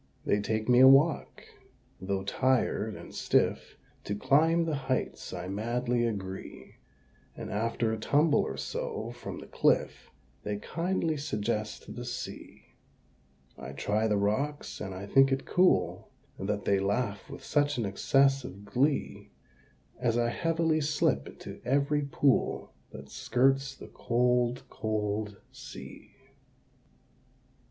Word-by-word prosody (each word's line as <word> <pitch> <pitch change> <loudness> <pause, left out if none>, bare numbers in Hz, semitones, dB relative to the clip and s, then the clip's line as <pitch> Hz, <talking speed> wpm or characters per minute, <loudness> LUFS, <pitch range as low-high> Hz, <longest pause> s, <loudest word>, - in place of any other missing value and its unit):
They 105 - +2
take 110 +1 -2
me 125 0 +5
a 130 - +9
walk: 140 +4 +4 0.6
though 95 0 -2
tired 130 +5 +1
and - - -11
stiff, - - 0 0.3
To 100 - -2
climb 155 +9 +3
the 160 - -1
heights 135 -2 -2
I 90 -1 -5
madly 120 +4 0
agree; 95 -4 -6 0.6
And, - - -6
after 115 +1 0
a 110 - -3
tumble 150 +6 +3
or - - -2
so - - -4
from - - -7
the - - -9
cliff, - - +1 0.3
They 105 +5 -3
kindly 165 - -1
suggest 105 -6 -3
the - - -5
Sea. - - -7 1.0
I 70 0 -7
try 105 +9 0
the 105 -1 +2
rocks, 135 +9 -1
and 95 -1 -5
I 95 +2 -6
think 135 +6 +5
it 135 0 -1
cool 180 0 +2 0.3
That 100 +1 -2
they 100 -1 +3
laugh 100 0 -1
with - - -9
such 145 -1 +1
an 115 - 0
excess 135 +7 +3
of 100 -3 -9
glee, 140 +7 0 0.7
As 120 -1 +1
I 120 0 +2
heavily 165 +3 +1
slip 150 +1 +1
into - - -10
every 140 +3 +1
pool 140 -1 +1 0.2
That - - -11
skirts 135 +1 +1
the - - -11
cold 125 +1 +1
cold 105 -1 -2
Sea. - - -11
120 Hz, 130 wpm, -29 LUFS, 105-140 Hz, 1.0 s, a